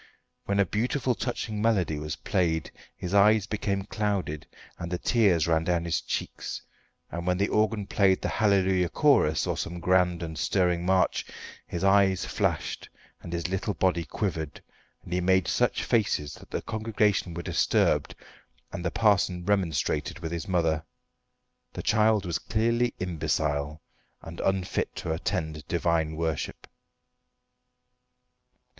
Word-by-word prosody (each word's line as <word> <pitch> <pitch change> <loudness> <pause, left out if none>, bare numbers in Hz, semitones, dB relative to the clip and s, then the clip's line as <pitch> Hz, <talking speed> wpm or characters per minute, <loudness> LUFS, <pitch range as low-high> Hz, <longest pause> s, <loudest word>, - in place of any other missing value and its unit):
When 100 0 0
a 100 - +5
beautiful, 125 - 0
touching 110 -3 -3
melody 95 -9 +1
was 75 0 -4
played 80 -4 -1 0.2
his 90 +1 -5
eyes 105 +1 +5
became 100 -2 -2
clouded 100 -8 -2 0.3
and 85 - -4
the 90 - 0
tears 95 - +3
ran 80 -1 +2
down 85 0 0
his 85 - 0
cheeks; - - -4 0.5
and 85 +1 -5
when 90 0 +2
the 100 +2 +1
organ 105 -1 +1
played 95 -1 +3
the - - +1
"Hallelujah 95 -4 +2
Chorus," 140 - +3
or - - -1
some 85 +1 -4
grand 90 -1 +2
and 80 -2 -5
stirring 90 0 +1
march, 95 0 +2 0.4
his 85 - -4
eyes 95 -1 +4
flashed, - - -2 0.3
and 85 - -8
his 85 -1 -2
little 95 +2 -2
body 90 -1 +1
quivered, 80 -7 -4 0.4
and 90 - -7
he 90 - +1
made 95 0 +3
such - - +1
faces 100 - +1
that - - -14
the - - -3
congregation 105 -5 0
were 85 - -4
disturbed - - +1 0.6
and 85 - -5
the 85 - 0
parson 90 -4 +2
remonstrated 85 -7 0
with 85 -2 -5
his 85 -2 -4
mother. 80 -4 +1 0.9
The - - -6
child 105 -1 +3
was 85 -2 -1
clearly 115 +2 0
imbecile, 75 -4 -1 0.4
and - - -9
unfit 95 -1 -1
to 80 - -3
attend 80 -4 -3
divine 85 -2 0
worship. 80 -1 -3
90 Hz, 140 wpm, -27 LUFS, 85-100 Hz, 0.9 s, a